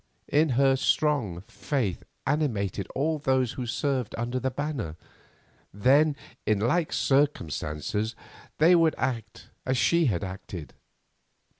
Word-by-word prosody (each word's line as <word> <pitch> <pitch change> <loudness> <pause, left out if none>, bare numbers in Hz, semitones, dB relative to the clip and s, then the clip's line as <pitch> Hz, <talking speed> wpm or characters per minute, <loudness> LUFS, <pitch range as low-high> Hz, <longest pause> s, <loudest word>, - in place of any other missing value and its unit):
If 155 +2 +3
her 135 +1 +4
strong 130 - +1
faith 110 -1 -3 0.2
animated 105 - 0
all 155 +3 0
those 130 -4 +1
who 125 -2 -5
served 130 -1 -1
under 120 +2 -2
that 130 -1 -2
banner, 140 - -3 0.8
then 140 +9 +4 0.3
in 110 - +2
like 150 +10 +1
circumstances 110 - 0 0.4
they 165 +4 +6
would 165 -2 +4
act 115 -5 -3
as 130 0 0
she 170 +6 +3
had 100 -5 0
acted. 95 -5 -7
130 Hz, 120 wpm, -27 LUFS, 105-150 Hz, 0.8 s, they